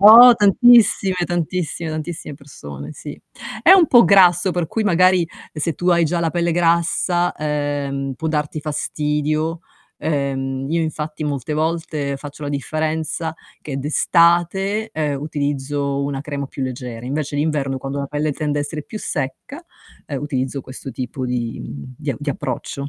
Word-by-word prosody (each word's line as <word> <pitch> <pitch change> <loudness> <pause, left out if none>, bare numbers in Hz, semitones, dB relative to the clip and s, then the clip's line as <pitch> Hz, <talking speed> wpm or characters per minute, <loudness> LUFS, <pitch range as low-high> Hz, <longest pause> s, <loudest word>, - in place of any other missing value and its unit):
Oh, 230 +4 +11
tantissime, 205 -2 +5
tantissime, 170 -1 -2
tantissime 155 -1 -5
persone, 75 - -10
sì. - - -9 0.4
È 340 +10 +7
un 365 -4 +6
po' 240 -4 +7
grasso, 180 -1 +5
per 175 -3 -1
cui 220 +3 -1
magari, 185 -2 +4 0.2
se 160 +2 -2
tu 175 +4 -2
hai 170 -1 +4
già 170 +2 0
la 165 -1 0
pelle 170 -1 0
grassa, 175 +1 +2
ehm, 145 -2 -2
può 160 +4 -3
darti 150 0 -2
fastidio. 150 +2 -1 0.4
Ehm, 135 -3 -2
io 165 0 +1
infatti 155 -1 -4
molte 145 0 -3
volte 155 -3 -1
faccio 145 +1 -9
la - - -3
differenza 155 +3 -2 0.3
che 140 -3 -5
d'estate, 175 +8 +2
ehm, 145 -3 -2
utilizzo 140 -1 -2
una 140 -1 -3
crema 140 -1 -4
più 135 - -6
leggera, 125 -2 -5
invece 145 +2 -3
d'inverno, 145 -3 0
quando 135 +2 -5
la 140 - -2
pelle 150 +2 -1
tende 145 0 -2
a - - +1
essere 150 +1 -5
più 215 - -7
secca, 145 - -4 0.5
ehm, 140 -1 -4
utilizzo 135 -1 -2
questo 130 +1 -9
tipo 125 +1 -4
di 120 -2 -3
mhmm, 70 - -8
di 145 -3 -3
di 145 0 -3
approccio. 140 +2 -4
150 Hz, 155 wpm, -20 LUFS, 140-170 Hz, 0.5 s, Oh